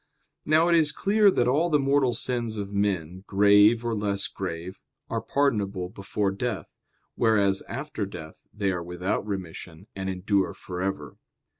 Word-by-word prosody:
Now 155 Hz, +2 st, +4 dB
it 175 Hz, -, +3 dB
is 160 Hz, -3 st, +4 dB
clear 205 Hz, +6 st, +3 dB
that 120 Hz, -10 st, +2 dB
all 150 Hz, +7 st, +2 dB
the 150 Hz, -, +4 dB
mortal 135 Hz, -3 st, +2 dB
sins 120 Hz, -2 st, -2 dB
of 100 Hz, -1 st, -5 dB
men, 95 Hz, -3 st, -1 dB
grave 105 Hz, +3 st, +5 dB
or 115 Hz, -, 0 dB
less 100 Hz, -2 st, 0 dB
grave, 90 Hz, 0 st, -6 dB, 0.3 s
are 115 Hz, -1 st, -1 dB
pardonable 105 Hz, -9 st, 0 dB
before 100 Hz, +1 st, -2 dB
death; 100 Hz, -4 st, -4 dB, 0.4 s
whereas 100 Hz, -4 st, +2 dB
after 135 Hz, -5 st, -4 dB
death 80 Hz, -5 st, -11 dB
they 100 Hz, -2 st, -1 dB
are 90 Hz, -2 st, -3 dB
without 90 Hz, +3 st, -2 dB
remission 90 Hz, -2 st, -6 dB
and 95 Hz, 0 st, -3 dB
endure 95 Hz, +1 st, 0 dB
for 90 Hz, -1 st, -7 dB
ever. 95 Hz, +1 st, -4 dB
100 Hz, 155 wpm, -26 LUFS, 95-120 Hz, 0.4 s, grave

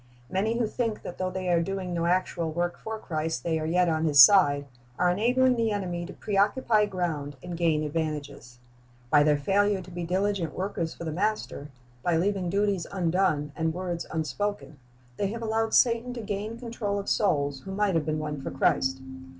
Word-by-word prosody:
Many 215 Hz, +5 st, 0 dB
who 240 Hz, -, +1 dB
think 225 Hz, 0 st, -2 dB
that 175 Hz, -, -8 dB
though 185 Hz, 0 st, 0 dB
they 185 Hz, 0 st, -4 dB
are 170 Hz, -1 st, +3 dB
doing 185 Hz, 0 st, -3 dB
no 170 Hz, 0 st, 0 dB
actual 175 Hz, -2 st, 0 dB
work 175 Hz, +2 st, -2 dB
for 220 Hz, 0 st, -5 dB
Christ, 160 Hz, -, -3 dB
they 160 Hz, -1 st, 0 dB
are 155 Hz, -, -3 dB
yet 180 Hz, +2 st, +3 dB
on 160 Hz, -1 st, +1 dB
His 145 Hz, -3 st, +3 dB
side, 145 Hz, -3 st, +7 dB, 0.3 s
are 180 Hz, 0 st, +3 dB
enabling 250 Hz, +6 st, +3 dB
the 230 Hz, -1 st, +1 dB
enemy 180 Hz, -4 st, -3 dB
to 195 Hz, -, -9 dB
pre 205 Hz, -, -4 dB
occupy 210 Hz, +1 st, +3 dB
ground 165 Hz, -7 st, -3 dB
and 175 Hz, -1 st, -5 dB
gain 165 Hz, -3 st, +1 dB
advantages. 150 Hz, -5 st, -4 dB, 0.5 s
By 150 Hz, -, +6 dB
their 150 Hz, 0 st, +4 dB
failure 200 Hz, +6 st, +2 dB
to 180 Hz, 0 st, -11 dB
be 175 Hz, 0 st, -5 dB
diligent 185 Hz, -2 st, -1 dB
w^orkers 185 Hz, -4 st, -3 dB
for -, -, -7 dB
the 160 Hz, -, -3 dB
Master, 190 Hz, -5 st, -2 dB, 0.3 s
by 170 Hz, +4 st, +1 dB
leaving 190 Hz, 0 st, 0 dB
duties 200 Hz, -2 st, 0 dB
undone 170 Hz, -5 st, +1 dB
and 160 Hz, 0 st, -1 dB
words 175 Hz, -2 st, -4 dB
unspoken, 160 Hz, +1 st, -3 dB, 0.4 s
they 200 Hz, -, 0 dB
have 230 Hz, +3 st, -5 dB
allowed 225 Hz, 0 st, 0 dB
Satan 240 Hz, 0 st, +3 dB
to 235 Hz, -, -5 dB
gain 210 Hz, +2 st, -4 dB
control 230 Hz, -4 st, -3 dB
of 200 Hz, -, -4 dB
souls 145 Hz, -9 st, +1 dB
who 190 Hz, -, -9 dB
might 200 Hz, 0 st, +1 dB
have 160 Hz, -2 st, 0 dB
been 155 Hz, 0 st, 0 dB
won 150 Hz, -2 st, -4 dB
for -, -, -4 dB
Christ. 130 Hz, 0 st, +1 dB
180 Hz, 195 wpm, -27 LUFS, 160-205 Hz, 0.5 s, side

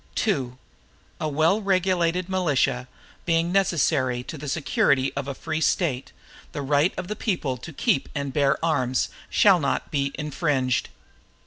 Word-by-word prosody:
II 135 Hz, -, 0 dB, 0.7 s
A 155 Hz, -, -1 dB
well 160 Hz, +8 st, +2 dB
regulated 185 Hz, -2 st, +1 dB
militia, 145 Hz, -9 st, +1 dB, 0.4 s
being 165 Hz, 0 st, +1 dB
necessary 145 Hz, -9 st, +1 dB
to 160 Hz, -, -7 dB
the 150 Hz, 0 st, -7 dB
security 140 Hz, -2 st, +1 dB
of 140 Hz, -1 st, -4 dB
a 140 Hz, -, -4 dB
free 160 Hz, +2 st, -3 dB
State, 135 Hz, -8 st, 0 dB, 0.4 s
the 145 Hz, -, -4 dB
right 145 Hz, +5 st, +3 dB
of 185 Hz, -, -4 dB
the 210 Hz, -, -3 dB
people 170 Hz, -, -1 dB
to 145 Hz, +7 st, -9 dB
keep 135 Hz, -2 st, 0 dB
and 140 Hz, -1 st, -3 dB
bear 140 Hz, -2 st, +2 dB
arms, 130 Hz, -6 st, +1 dB, 0.2 s
shall 195 Hz, -4 st, +5 dB
not 145 Hz, -, -1 dB
be 140 Hz, -2 st, 0 dB
infringed. 145 Hz, -4 st, 0 dB
150 Hz, 145 wpm, -24 LUFS, 135-175 Hz, 0.7 s, shall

